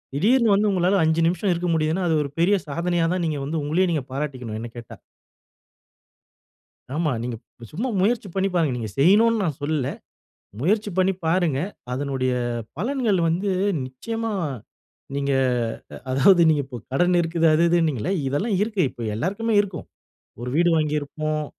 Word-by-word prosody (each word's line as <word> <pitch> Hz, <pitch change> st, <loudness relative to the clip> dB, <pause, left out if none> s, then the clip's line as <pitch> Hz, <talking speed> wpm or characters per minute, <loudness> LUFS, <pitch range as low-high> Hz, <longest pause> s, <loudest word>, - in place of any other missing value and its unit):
திடீர்ன்னு 225 Hz, -, +4 dB
வந்து, 210 Hz, +1 st, +2 dB
உங்களால 185 Hz, +1 st, +2 dB
5 160 Hz, +1 st, +2 dB
நிமிஷம் 180 Hz, +3 st, 0 dB
இருக்க 175 Hz, +1 st, -2 dB
முடியுதுன்னா 160 Hz, +3 st, 0 dB
அது 160 Hz, -, +2 dB
ஒரு 140 Hz, -, -6 dB
பெரிய 185 Hz, +5 st, +4 dB
சாதனையா 170 Hz, +2 st, 0 dB
தான், 185 Hz, -2 st, -1 dB
நீங்க 150 Hz, -2 st, -2 dB
வந்து 155 Hz, +1 st, -2 dB
உங்களையே 170 Hz, +6 st, +1 dB
நீங்க 150 Hz, -6 st, -1 dB
பாராட்டிக்கணும், 130 Hz, -6 st, -4 dB
என்ன 115 Hz, 0 st, -7 dB
கேட்டா. 120 Hz, -2 st, -9 dB, 2.0 s
ஆமா. 160 Hz, -2 st, +1 dB
நீங்க 120 Hz, -1 st, -4 dB, 0.4 s
சும்மா 225 Hz, +11 st, -2 dB
முயற்சி 215 Hz, +1 st, +1 dB
பண்ணி 195 Hz, 0 st, +1 dB
பாருங்க. 160 Hz, -6 st, +2 dB
நீங்க 110 Hz, -3 st, -4 dB
செய்யணும்னு 215 Hz, +8 st, +4 dB
நான் 150 Hz, -5 st, -2 dB
சொல்லல. 145 Hz, -3 st, -1 dB, 0.7 s
முயற்சி 205 Hz, +6 st, +1 dB
பண்ணி 190 Hz, +1 st, +3 dB
பாருங்க. 165 Hz, -5 st, +1 dB, 0.3 s
அதனுடைய 130 Hz, -1 st, -1 dB, 0.5 s
பலன்கள் 230 Hz, -1 st, 0 dB
வந்து 185 Hz, +5 st, 0 dB, 0.4 s
நிச்சயமா 225 Hz, -, -4 dB, 0.8 s
நீங்க 140 Hz, 0 st, 0 dB, 0.8 s
அதாவது 170 Hz, +7 st, +5 dB
நீங்க, 150 Hz, -2 st, +2 dB
இப்போ 130 Hz, -1 st, -9 dB, 0.2 s
கடன் 175 Hz, +6 st, +3 dB
இருக்குது, 165 Hz, 0 st, +1 dB
அது 165 Hz, +2 st, +3 dB
இதுன்னீங்கள்ல. 165 Hz, -, +1 dB, 0.2 s
இதெல்லாம் 170 Hz, -, 0 dB
இருக்கு. 210 Hz, -2 st, -1 dB
இப்ப 120 Hz, -, -9 dB
எல்லாருக்குமே 200 Hz, -, -1 dB
இருக்கும். 190 Hz, -5 st, -4 dB, 0.6 s
ஒரு 125 Hz, -, -4 dB
வீடு 175 Hz, +2 st, +4 dB
வாங்கிருப்போம். 155 Hz, 0 st, -1 dB
165 Hz, 145 wpm, -23 LUFS, 145-195 Hz, 2.0 s, அதாவது